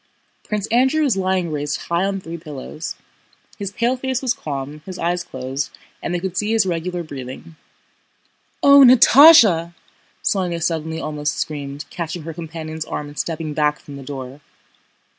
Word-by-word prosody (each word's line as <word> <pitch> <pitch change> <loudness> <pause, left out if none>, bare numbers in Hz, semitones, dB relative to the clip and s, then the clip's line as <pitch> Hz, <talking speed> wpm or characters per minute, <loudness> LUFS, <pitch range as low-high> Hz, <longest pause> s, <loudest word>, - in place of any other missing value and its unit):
Prince 210 -1 -2
Andrew 265 +6 +3
was 270 -8 +2
lying 185 -3 0
raised 145 0 -2
high 170 +2 0
on 195 0 -1
three 170 -2 -8
pillows. 155 0 -7 0.6
His 200 -1 -3
pale 240 +4 0
face 260 0 -2
was 260 -3 0
calm, 145 0 -6
his 185 -1 -6
eyes 175 +1 -1
closed, 130 -2 -5 0.2
and - - -3
they 175 - -1
could 185 0 -4
see 210 +4 0
his 220 -3 +3
regular 175 0 -2
breathing. 140 +2 -9 1.1
"O, 280 0 +8
Natásha!" 245 - +7 0.5
Sónya 180 -4 0
suddenly 160 -1 -2
almost 150 -1 -3
screamed, 145 -2 -4
catching 170 -1 -5
her 165 +1 -6
companion's 160 -1 -6
arm 145 - -5
and 145 - -9
stepping 160 -2 -3
back 150 0 +1
from 145 - -11
the 140 - -8
door. 135 0 -8
170 Hz, 160 wpm, -20 LUFS, 150-195 Hz, 1.1 s, O